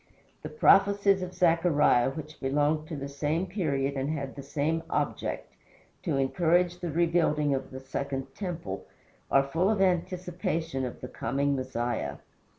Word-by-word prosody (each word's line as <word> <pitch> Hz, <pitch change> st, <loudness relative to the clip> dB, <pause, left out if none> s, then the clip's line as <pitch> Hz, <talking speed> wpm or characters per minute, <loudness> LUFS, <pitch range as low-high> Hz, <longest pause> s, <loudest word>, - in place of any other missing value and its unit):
The -, -, -6 dB
prophecies 200 Hz, -, +4 dB
of 180 Hz, 0 st, -4 dB
Zechariah, 165 Hz, -7 st, +4 dB
which 155 Hz, +2 st, -8 dB
belonged 150 Hz, +3 st, +1 dB
to 160 Hz, -, -5 dB
the 140 Hz, -1 st, -5 dB
same 150 Hz, +5 st, -1 dB
period 145 Hz, -8 st, -1 dB
and 135 Hz, +1 st, -2 dB
had 140 Hz, -4 st, -3 dB
the 140 Hz, -, -6 dB
same 150 Hz, +4 st, -1 dB
object, -, -, -2 dB, 0.5 s
to -, -, -1 dB
encourage 175 Hz, +5 st, +2 dB
the 175 Hz, -1 st, -3 dB
rebuilding 160 Hz, -3 st, +2 dB
of 135 Hz, 0 st, -3 dB
the 130 Hz, -, -7 dB
second 135 Hz, 0 st, -4 dB
temple, 170 Hz, -, -5 dB, 0.4 s
are 135 Hz, -, +5 dB
full 165 Hz, +8 st, +1 dB
of 215 Hz, -2 st, +1 dB
anticipation 175 Hz, -5 st, -1 dB
of 125 Hz, -, -9 dB
the 125 Hz, -, -5 dB
coming 140 Hz, +3 st, -1 dB
Messiah. 120 Hz, -3 st, -2 dB
150 Hz, 150 wpm, -28 LUFS, 135-175 Hz, 0.5 s, are